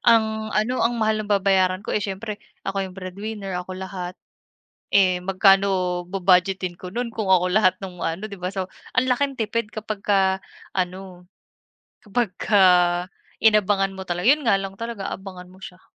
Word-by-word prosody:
ang 220 -1 +3
ano, 245 +4 +1
ang 235 +1 +1
mahal 215 -1 +1
ng 210 - -6
babayaran 195 -1 +2
ko, - - -3
eh, - - +1
siyempre 205 +1 -5 0.2
ako 195 0 -2
yung 185 - -14
breadwinner, 195 +2 -6
ako 185 +1 -8
lahat. 185 -1 -6 0.8
Eh, 185 -3 +4
magkano 190 -1 +3
bu-budgetin 185 -1 +2
ko 180 - -8
no'n 240 +1 -2
kung 215 -3 -2
ako 180 -1 +5
lahat 185 -2 +4
ng 180 -2 -9
ano, 165 +6 -2
'di 200 - -8
ba? 180 - -2
So, 190 -1 -1 0.3
ang 255 - +4
laking 275 +1 +1
tipid 225 0 -1
kapagka 200 -3 0 0.3
ano, 185 -1 -4 0.8
kapagka 210 -2 +1 0.8
inabangan 205 -3 +3
mo, 190 - -5 0.2
'yon 290 +3 +4
nga 225 - +5
lang 195 0 -6
talaga, 230 -4 -5
abangan 185 -2 -9
mo 185 - -17
siya. 180 -1 -10
195 Hz, 160 wpm, -23 LUFS, 185-215 Hz, 0.8 s, ako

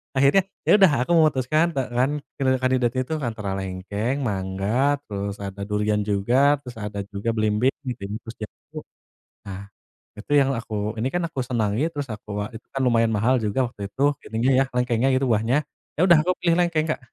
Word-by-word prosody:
Akhirnya 140 +8 +5 0.2
ya - - +3
udah, 190 -5 +6
aku 130 - -1
memutuskan, 155 0 +3
te 135 - +1 0.2
kan, 130 +2 +3
eee, 130 -2 -1
kandidatnya 130 -1 +1
itu 160 - -4
antara 110 -8 -3
lengkeng, 95 +6 -3
mangga, 105 +6 0
terus 100 -1 -3
ada 100 0 -6
durian 105 0 +1
juga, 100 +5 +1 0.2
terus 125 -4 -10
ada 105 -1 -5
juga 100 +3 -2
belimbing 110 +4 +2
belimbing, 110 -6 -5
terus 115 0 -10
jambu. - - -12 0.7
Ah, 100 0 -7 0.5
itu 105 +7 -10
yang 135 -1 +3
aku 115 -1 -9 0.3
ini 120 - 0
kan, 175 - 0
aku 160 -5 -6
senangi, 115 -3 -1
terus 145 -1 -3
aku 105 0 -12
a - - -3
itu 110 - -10
kan 135 - -2
lumayan 115 -2 +3
mahal 115 +5 +2
juga 110 +5 +1
waktu 115 -3 -13
itu, 135 - -2 0.3
ininya 115 +4 +1
ya, - - +5
lengkengnya 125 +1 +2
itu, 135 +1 +1
buahnya. 115 +4 +2 0.4
Ya - - +3
udah, 170 -3 +7
aku 180 - +1
pilih 170 -1 +2
lengkeng 170 -3 +2
Kak, 155 - -1
120 Hz, 185 wpm, -23 LUFS, 105-135 Hz, 0.7 s, udah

